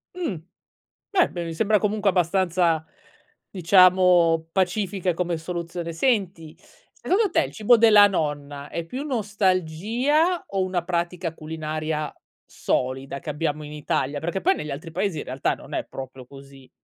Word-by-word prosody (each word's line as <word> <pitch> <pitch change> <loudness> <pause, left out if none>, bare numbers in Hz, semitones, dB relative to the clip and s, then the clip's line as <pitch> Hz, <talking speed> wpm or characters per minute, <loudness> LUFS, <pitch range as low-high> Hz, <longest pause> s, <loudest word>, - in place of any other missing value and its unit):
Mh, 335 - -3 0.8
beh 370 -4 +3
b - - -9
mi 165 -1 -5
sembra 210 +4 +2
comunque 210 0 +1
abbastanza, 175 -2 +1 0.7
diciamo 180 -2 +4
pacifica 190 0 0
come 175 -1 -1
soluzione. 170 0 -5
Senti, 180 - -1 0.4
secondo 410 +3 +1
te - - +3
il - - -7
cibo 225 +2 +4
della 210 -2 +7
nonna 145 -5 -3
è 170 +2 -4
più 255 - -6
nostalgia 220 - 0
o 195 -1 -1
una 180 -2 -2
pratica 175 -1 -2
culinaria 155 -1 -4 0.3
solida 130 +2 -2
che 150 - -6
abbiamo 150 0 -2
in 150 - -9
Italia? 145 -1 -2
Perché 175 +3 -3
poi 380 +3 +3
negli 150 - -6
altri 155 +4 -7
paesi 185 -2 -1
in - - -4
realtà 130 +1 -1
non - - -11
è - - -1
proprio 130 -1 -9
così. 135 0 -15
175 Hz, 145 wpm, -24 LUFS, 155-200 Hz, 0.8 s, della